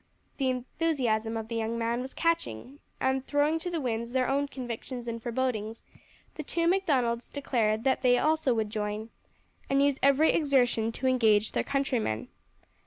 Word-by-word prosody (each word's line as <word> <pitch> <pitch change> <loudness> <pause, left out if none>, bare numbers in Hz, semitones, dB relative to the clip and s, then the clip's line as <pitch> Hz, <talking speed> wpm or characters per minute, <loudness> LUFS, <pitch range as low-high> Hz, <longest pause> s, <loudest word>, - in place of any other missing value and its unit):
The 265 -2 +1
enthusiasm 250 -4 -1
of 220 -1 -5
the 230 - -5
young 225 +1 -1
man 235 +1 -1
was 260 +1 -8
catching, 290 - -1 0.2
and 265 0 +1
throwing 295 +2 +2
to 355 - -4
the 340 -2 -2
winds 235 -3 -3
their 255 -1 +2
own 280 +1 +1
convictions 245 -1 -6
and 230 0 -4
forebodings, 230 -2 -2 0.5
the - - -6
two 335 +3 -1
Macdonalds 265 -11 +1
declared 225 -6 0
that 265 0 +2
they 245 -1 +4
also 310 -1 +2
would 215 -2 -1
join, 215 +1 -3 0.6
and 275 - +3
use 280 -1 +2
every 280 +3 +5
exertion 245 -7 +2
to 260 - -5
engage 220 -5 +3
their - - 0
countrymen. 255 - -1
255 Hz, 165 wpm, -28 LUFS, 225-280 Hz, 0.6 s, every